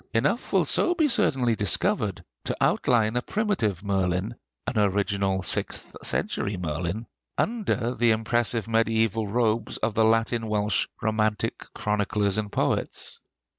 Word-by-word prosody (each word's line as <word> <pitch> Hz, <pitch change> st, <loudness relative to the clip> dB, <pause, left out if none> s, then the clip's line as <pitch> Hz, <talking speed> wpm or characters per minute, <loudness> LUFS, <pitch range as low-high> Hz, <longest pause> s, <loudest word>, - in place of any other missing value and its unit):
Enough 145 Hz, -, 0 dB
will -, -, +3 dB
so 355 Hz, -, +3 dB
be 320 Hz, -3 st, +3 dB
certainly 135 Hz, -, +2 dB
discovered 105 Hz, -4 st, 0 dB, 0.2 s
to -, -, -2 dB
outline 115 Hz, -2 st, +2 dB
a 125 Hz, -, +1 dB
primitive 125 Hz, -, -1 dB
Merlin, 95 Hz, +1 st, 0 dB, 0.3 s
an -, -, -1 dB
original 100 Hz, -1 st, +1 dB
sixth -, -, 0 dB
century 100 Hz, -1 st, -1 dB
Merlin, 85 Hz, +6 st, -3 dB, 0.3 s
under 195 Hz, -, 0 dB
the 120 Hz, -1 st, +2 dB
impressive 115 Hz, 0 st, 0 dB
mediæval 115 Hz, -2 st, +1 dB
robes 115 Hz, -1 st, 0 dB
of 110 Hz, 0 st, -1 dB
the 110 Hz, -, +3 dB
Latin 115 Hz, +1 st, +2 dB
Welsh 105 Hz, -2 st, +1 dB, 0.2 s
romantic 110 Hz, -1 st, 0 dB
chroniclers 105 Hz, -1 st, 0 dB
and 105 Hz, -1 st, -4 dB
poets. -, -, -2 dB
110 Hz, 130 wpm, -26 LUFS, 100-120 Hz, 0.3 s, will